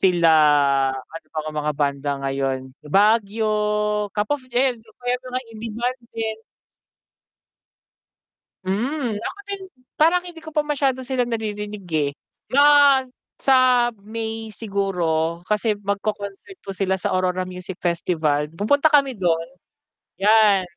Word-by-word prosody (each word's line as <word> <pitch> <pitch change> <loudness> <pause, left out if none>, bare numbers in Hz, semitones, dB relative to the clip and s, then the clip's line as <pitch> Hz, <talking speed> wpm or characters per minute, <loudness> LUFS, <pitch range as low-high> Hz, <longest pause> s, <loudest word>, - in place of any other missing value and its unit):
Sila 175 -3 +4 0.7
ano, 165 +5 -10
pang 155 0 -3
mga 150 0 -1
banda 140 -1 -1
ngayon, 135 -1 -2 0.2
Baguio, 210 +1 +2
Cap 210 +5 0
of 290 - -1
Joe, 240 - -8
ayan 255 -3 +1
isa 220 - -26
pa 245 - -22
yan 250 - -1
sa 255 - -11
mga 255 +1 -1
in-demand 230 +3 -3 0.2
din. 220 -1 -3 2.2
Mm 240 +7 -1
ako 395 - -5
din, 400 -1 -4 0.4
parang 340 +3 +5
hindi 345 -2 -9
ko 320 - -11
pa 300 -1 +2
masyado 275 -3 0
silang 250 -2 -1
naririnig, 210 -3 -4
eh. 145 -2 +1 0.4
Na 285 -1 +6 0.3
sa 255 -2 +4
May 225 +1 -5
siguro 180 -6 -1
kasi 210 +2 0
magko-concert 205 - -4
po 195 - -5
sila 190 0 0
sa 185 - -2
Aurora 185 0 0
Music 180 0 -8
Festival, 160 -4 0
pupunta 285 - +3
kami 280 -3 +4
dun. 170 -6 0 0.8
'Yan. 210 -2 +5
210 Hz, 130 wpm, -22 LUFS, 180-250 Hz, 2.2 s, Na